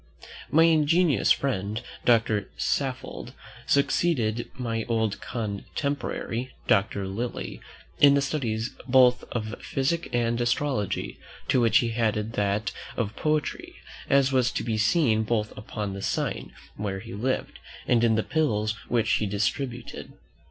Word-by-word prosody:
My 160 Hz, +2 st, +5 dB
ingenious 165 Hz, -1 st, +4 dB
friend, 105 Hz, -5 st, 0 dB, 0.3 s
Doctor 110 Hz, -4 st, +3 dB
Saffold, 130 Hz, -2 st, -2 dB, 0.3 s
succeeded 125 Hz, -6 st, +1 dB
my 115 Hz, -3 st, -2 dB
old 110 Hz, -3 st, 0 dB
contemporary, 120 Hz, +2 st, -3 dB
Doctor 100 Hz, 0 st, +2 dB
Lilly, 115 Hz, +6 st, -4 dB, 0.4 s
in 140 Hz, -1 st, +7 dB
the 140 Hz, -, +3 dB
studies 120 Hz, -5 st, -2 dB, 0.2 s
both 125 Hz, -1 st, +5 dB
of 110 Hz, -1 st, -4 dB
physic 160 Hz, +6 st, -1 dB
and 120 Hz, 0 st, +1 dB
astrology, 120 Hz, -3 st, -1 dB, 0.3 s
to 130 Hz, -, +4 dB
which 115 Hz, -1 st, +5 dB
he 115 Hz, -2 st, +1 dB
added 110 Hz, -1 st, 0 dB
that 105 Hz, +1 st, 0 dB, 0.3 s
of 110 Hz, -2 st, -2 dB
poetry, 155 Hz, -1 st, -1 dB, 0.3 s
as 140 Hz, -1 st, +4 dB
was 130 Hz, -2 st, +3 dB
to -, -, -2 dB
be 115 Hz, -2 st, -1 dB
seen 110 Hz, +1 st, +3 dB
both 110 Hz, -1 st, -1 dB
upon 105 Hz, -1 st, -5 dB
the 100 Hz, -, -6 dB
sign -, -, -2 dB, 0.3 s
where 100 Hz, -2 st, -3 dB
he 115 Hz, +2 st, -9 dB
lived, 125 Hz, +6 st, -2 dB, 0.3 s
and 120 Hz, -1 st, +3 dB
in 115 Hz, -1 st, +4 dB
the 110 Hz, -, +1 dB
pills 110 Hz, -9 st, 0 dB, 0.2 s
which 115 Hz, -2 st, +1 dB
he 105 Hz, -, -1 dB
distributed. 120 Hz, +5 st, -3 dB
115 Hz, 130 wpm, -26 LUFS, 110-135 Hz, 0.4 s, in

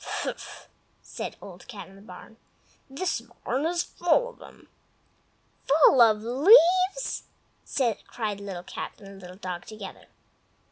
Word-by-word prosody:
"Fffff!" -, -, -5 dB, 0.4 s
said -, -, -6 dB
Old 180 Hz, -2 st, -12 dB
Cat 215 Hz, -6 st, -9 dB
in 190 Hz, -, -16 dB
the 195 Hz, -, -15 dB
Barn. 200 Hz, +3 st, -13 dB, 0.5 s
"This 280 Hz, 0 st, -2 dB, 0.2 s
barn 270 Hz, +6 st, 0 dB
is 345 Hz, 0 st, 0 dB
full 355 Hz, +8 st, +1 dB
of 485 Hz, -, -17 dB
'em!" -, -, -15 dB, 1.0 s
"Full 280 Hz, -3 st, +6 dB
of 215 Hz, -2 st, +5 dB
leaves!" 365 Hz, -, +4 dB, 0.8 s
cried 210 Hz, -4 st, -4 dB
Little 195 Hz, -3 st, -6 dB
Cat -, -, -6 dB
and 195 Hz, -1 st, -12 dB
Little 180 Hz, 0 st, -11 dB
Dog 180 Hz, -3 st, -6 dB
together. 215 Hz, -3 st, -10 dB
225 Hz, 130 wpm, -27 LUFS, -, 1.0 s, Full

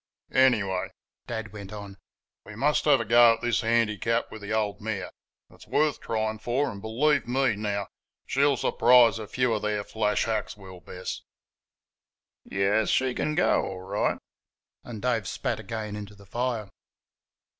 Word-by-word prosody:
"Anyway," 105 Hz, -8 st, +3 dB, 0.4 s
Dad 110 Hz, -3 st, -5 dB
went 100 Hz, -2 st, -9 dB
on, 100 Hz, -2 st, -8 dB, 0.5 s
"we 110 Hz, -, -11 dB
must 145 Hz, +6 st, +1 dB
have 145 Hz, -3 st, +5 dB
a -, -, -2 dB
go 120 Hz, 0 st, +7 dB
at -, -, -16 dB
this 120 Hz, -1 st, +1 dB
handicap 115 Hz, 0 st, +1 dB
with 110 Hz, -, -9 dB
the 100 Hz, -, -6 dB
old 110 Hz, -2 st, -1 dB
mare; 100 Hz, -4 st, -4 dB, 0.4 s
it's -, -, -16 dB
worth 150 Hz, -1 st, +1 dB
trying 110 Hz, -1 st, -2 dB
for, 130 Hz, +5 st, 0 dB
and, 100 Hz, -, -9 dB
believe 135 Hz, +6 st, +1 dB
me, 130 Hz, -2 st, +1 dB
now! 100 Hz, -1 st, -2 dB, 0.4 s
she'll 140 Hz, 0 st, +2 dB
surprise 120 Hz, -2 st, +5 dB
a 110 Hz, -, -6 dB
few 125 Hz, 0 st, +1 dB
of 105 Hz, -, -1 dB
their 105 Hz, -1 st, -1 dB
flash 105 Hz, 0 st, 0 dB
hacks, 110 Hz, -2 st, -2 dB
will 95 Hz, -2 st, -11 dB
Bess." 90 Hz, +2 st, -7 dB, 1.2 s
"Yairs, 100 Hz, +3 st, +1 dB
she 130 Hz, -1 st, +2 dB
can 150 Hz, +4 st, -1 dB
go -, -, +3 dB
all 95 Hz, -1 st, -5 dB
right." 95 Hz, -, -1 dB, 0.7 s
And 115 Hz, -3 st, -8 dB
Dave 115 Hz, -6 st, 0 dB
spat -, -, -2 dB
again 110 Hz, -3 st, -5 dB
into 105 Hz, -1 st, -8 dB
the 100 Hz, 0 st, -17 dB
fire. 115 Hz, -1 st, -2 dB
110 Hz, 160 wpm, -27 LUFS, 105-120 Hz, 1.2 s, go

